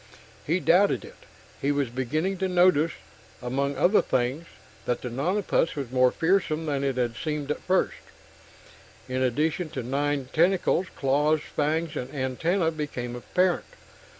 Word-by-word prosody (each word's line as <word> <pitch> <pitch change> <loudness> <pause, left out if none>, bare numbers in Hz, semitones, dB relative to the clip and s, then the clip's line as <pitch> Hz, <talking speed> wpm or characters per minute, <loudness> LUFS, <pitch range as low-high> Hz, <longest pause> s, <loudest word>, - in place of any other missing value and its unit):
He 170 +5 +2
doubted 180 +6 +3
it. - - -16 0.3
He 140 - +1
was 140 -4 -1
beginning 155 +10 -1
to 190 - +1
notice, 175 -3 +3 0.5
among 135 +3 -2
other 185 +9 +4
things, 130 +7 -1 0.4
that 125 - -1
the 125 - -4
nonapus 170 - 0
was 135 -5 -5
more 130 -1 +4
fearsome 165 0 +1
than 140 -3 -1
it 135 -2 -1
had 120 -2 0
seemed 150 +1 -3
at - - -2
first 185 +1 0 1.1
in 130 0 -2
addition 155 +6 0
to 130 -4 -5
nine 140 +1 -1
tentacles, 180 +2 +2
claws, 150 +3 +2
fangs 155 +2 0
and 125 +1 -4
antenna 160 +7 0
became 135 -6 -4
apparent. 180 +8 0
150 Hz, 145 wpm, -26 LUFS, 130-170 Hz, 1.1 s, other